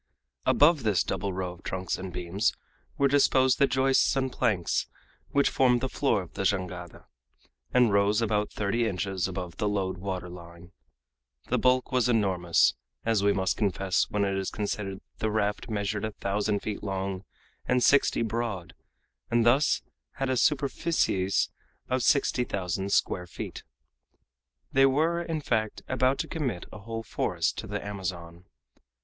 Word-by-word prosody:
Above 150 0 +5
this 105 -5 +2
double 100 - -2
row 90 -1 -3
of 90 - -16
trunks 95 -1 -3
and 95 0 -6
beams 90 +5 0 0.4
were 140 - +4
disposed 130 -2 +3
the 140 - +5
joists 135 +1 +3
and 130 -1 0
planks 105 -9 0 0.4
which 140 0 +3
formed 125 -2 +3
the 130 - -1
floor 130 -7 0
of 85 - -15
the - - -4
jangada, 90 -3 -2 0.7
and 125 -4 +4
rose 100 +1 +3
about 105 -2 0
thirty 110 +3 0
inches 95 -2 -1
above 90 -2 -6
the 105 - 0
load 95 -3 -2
water 95 -1 -4
line. 85 0 -12 0.8
The - - +2
bulk 130 +1 +2
was 125 -1 +2
enormous, 95 -7 +3 0.3
as 115 -3 +2
we 100 0 +4
must 95 -2 0
confess 95 -2 +1
when 100 -1 0
it 100 0 -1
is 95 - -2
considered 100 -2 -3
that - - -19 0.2
the 110 - 0
raft 105 +2 -1
measured 105 0 -2
a 110 -1 -3
thousand 100 +1 -1
feet 105 -2 -4
long 95 -1 -3 0.4
and 125 -1 +2
sixty 140 -4 +4
broad, 110 -6 -3 0.6
and 120 -1 +2
thus 135 +5 +3 0.3
had 135 -1 -2
a - - +1
superificies 135 - +1 0.4
of 130 0 +1
sixty 130 -2 +3
thousand 95 -2 -3
square 90 -2 +1
feet. - - -7 1.1
They 135 0 +5
were, 160 +5 +1
in 165 -2 -3
fact, 110 -6 -1
about 130 +1 +2
to - - -2
commit 130 - -3
a 105 - -9
whole 115 +2 -5
forest - - -1
to - - -6
the - - -4
Amazon. 90 -3 -6
105 Hz, 160 wpm, -28 LUFS, 95-125 Hz, 1.1 s, Above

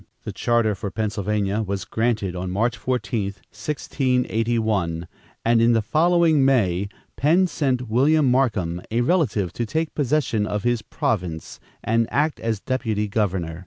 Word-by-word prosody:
The - - -5
charter 115 -3 +1
for 100 +1 -5
Pennsylvania 105 0 -1
was 100 -2 -3
granted 110 -5 -1
on 90 +1 -4
March 115 +6 0
14, 120 -5 -2 0.3
1681, 115 - -1 0.4
and 115 0 +4
in 120 +1 +4
the 115 - +3
following 165 +1 +3
May, 100 -8 +2 0.3
Penn 165 +7 +4
sent 130 -7 -1
William 140 +7 +3
Markham, 110 -10 +1
a 115 +2 +1
relative, 120 - +1
to 120 - -2
take 160 +7 -2
possession 130 -7 0
of 105 -1 -2
his 120 -2 +1
province 90 - -3 0.2
and 115 0 +1
act 150 +2 +1
as 115 -2 -2
deputy 110 -3 -1
governor. 95 -6 -1
115 Hz, 140 wpm, -23 LUFS, 100-130 Hz, 0.4 s, and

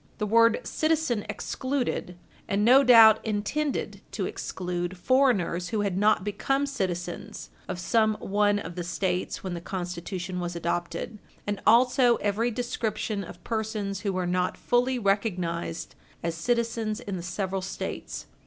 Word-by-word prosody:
The 210 - -1
word 230 +2 +4
citizen 310 -9 0
excluded, 255 -9 -2 0.3
and 205 +1 +1
no 260 +4 +7
doubt 225 -4 +8
intended 220 +8 -2
to - - -2
exclude, 180 0 -4
foreigners 200 -7 +2
who 215 -2 0
had 200 -3 -1
not 210 0 +3
become 270 +8 0
citizens 180 -10 -4 0.2
of 180 -1 -4
some 220 +3 +2
one 205 0 +1
of 180 -4 -5
the 175 0 -4
States 180 +1 -2
when 185 -2 -3
the 170 - -5
Constitution 180 0 -4
was 175 0 -3
adopted, 170 +5 -3 0.3
and 205 -1 -3
also 245 +1 +5
every 210 +3 0
description 220 -3 -2
of 175 0 -11
persons 215 -3 -2
who 205 -2 -1
were 185 -1 -1
not 180 +1 0
fully 250 +1 +1
recognised 185 -6 -1 0.3
as 170 0 -1
citizens 230 +3 -1
in 200 -5 -5
the 175 - -4
several 190 +2 -3
States. 190 - -5
205 Hz, 145 wpm, -27 LUFS, 180-230 Hz, 0.3 s, doubt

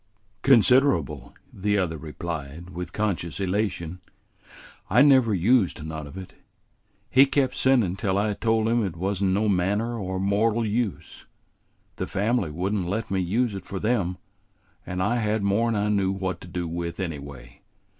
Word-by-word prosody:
"Considerable," 115 - +3 0.2
the 105 +2 0
other 90 -4 0
replied, 80 +1 -6
with 90 0 -6
conscious 90 -7 -2
elation. 95 -3 -2 0.9
"I 120 +8 +6
never 130 -5 +5
used 95 -3 +2
none 80 -2 -6
of 70 - -11
it. 95 -1 -9 0.8
He 135 +2 +6
kept 135 -2 +1
sendin' 120 -10 +2
till 100 -3 0
I 105 +1 +1
told 110 +1 +1
him 115 0 +2
it 95 -5 -3
wa'n't 95 +3 -2
no 100 +2 +2
manner 105 +5 0
o' 95 -1 -3
mortal 105 +4 +1
use; 110 -1 -3 0.7
the - - -3
family 105 -2 0
would 90 +7 -2
n't 95 -5 -1
let 110 +3 -3
me 95 - +1
use 105 +6 0
it 95 -2 -7
for 95 - -4
them, 100 -5 0 0.7
and 90 0 -2
I 120 +5 +1
had 110 -2 0
more 100 +4 +2
'n 115 - 0
I 105 0 0
knew 100 -2 +1
what 95 -2 -3
to - - -10
do 90 -1 -4
with 85 +1 -4
anyway. 70 -7 -7
100 Hz, 165 wpm, -25 LUFS, 90-110 Hz, 0.9 s, I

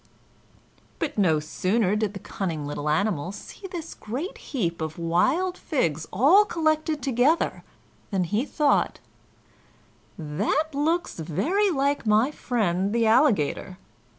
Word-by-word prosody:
But 305 -3 -3
no 175 -7 +3
sooner 185 +6 0
did 210 -1 -1
the - - -5
cunning 165 -6 -4
little 145 +1 -3
animal 180 0 0
see 210 - -10
this 340 -3 -7
great 265 - -6
heap 175 - -3
of 160 0 -4
wild 260 - +1
figs 165 - -1
all 295 - +6
collected 310 -5 0
together 270 +5 +1 0.5
than 195 -3 0
he 210 +7 0
thought, 295 0 +1 1.2
"That 205 - -1
looks 315 - -1
very 335 - +1
like 280 -6 0
my 215 +6 +4
friend 205 - -1
the 230 -1 +3
Alligator." 220 - +2
220 Hz, 125 wpm, -25 LUFS, -, 1.2 s, all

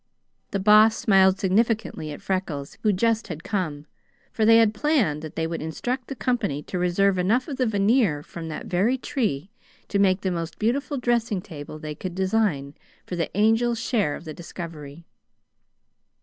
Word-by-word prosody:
The 200 - -2
Boss 215 +2 +6
smiled 190 -2 +4
significantly 205 -5 0
at 145 - -9
Freckles, 165 -7 -3
who 215 - +3
just 225 +3 +1
had 165 -3 -7
come, 155 -8 -3 0.5
for 220 - +1
they 225 +1 +7
had 225 -2 +4
planned 220 - +1
that 155 -1 -8
they 160 - -1
would 165 0 -4
instruct 245 - -3
the 275 - -5
company 200 - -1
to 180 - -4
reserve 185 +2 +2
enough 225 +8 +1
of 280 -4 -5
the 255 - +1
veneer 205 - +2
from 165 +1 -8
that 155 - -6
very 205 +9 +1
tree 205 - -2 0.4
to 200 - 0
make 190 -1 +3
the 190 - -1
most 170 -1 -4
beautiful 275 +6 -1
dressing 235 -5 0
table 155 -5 -9
they 155 -1 -6
could 175 +3 -6
design 185 -8 0 0.3
for 180 - -5
the 175 +2 -3
Angel's 225 +2 +3
share 210 - 0
of 170 - -11
the 155 - -6
discovery. 165 -2 -9
195 Hz, 175 wpm, -24 LUFS, 165-225 Hz, 0.5 s, they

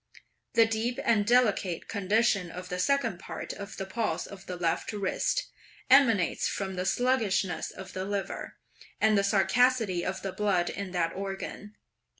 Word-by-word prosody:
The 230 - +6
deep 225 +3 -1
and 210 -3 +3
delicate 215 -8 +2
condition 205 -2 +1
of 180 +2 -8
the 180 -1 -3
second 230 -3 +1
part - - -6
of 200 +1 -8
the 195 - -3
pulse 215 +3 -2
of 200 -1 -11
the 180 - -4
left 170 -2 -1
wrist, 210 - -1 0.4
emanates 230 -10 +5
from 190 -1 -3
the 180 0 -2
sluggishness 210 -7 +1
of 190 0 -10
the 185 - -3
liver, 200 0 -4 0.4
and 220 0 +4
the 200 - +3
scarcity 210 -1 +2
of 190 - -3
the 195 -1 -3
blood 190 -4 +1
in 200 -1 -5
that 165 -2 0
organ. 195 +2 -6
200 Hz, 155 wpm, -29 LUFS, 185-225 Hz, 0.4 s, The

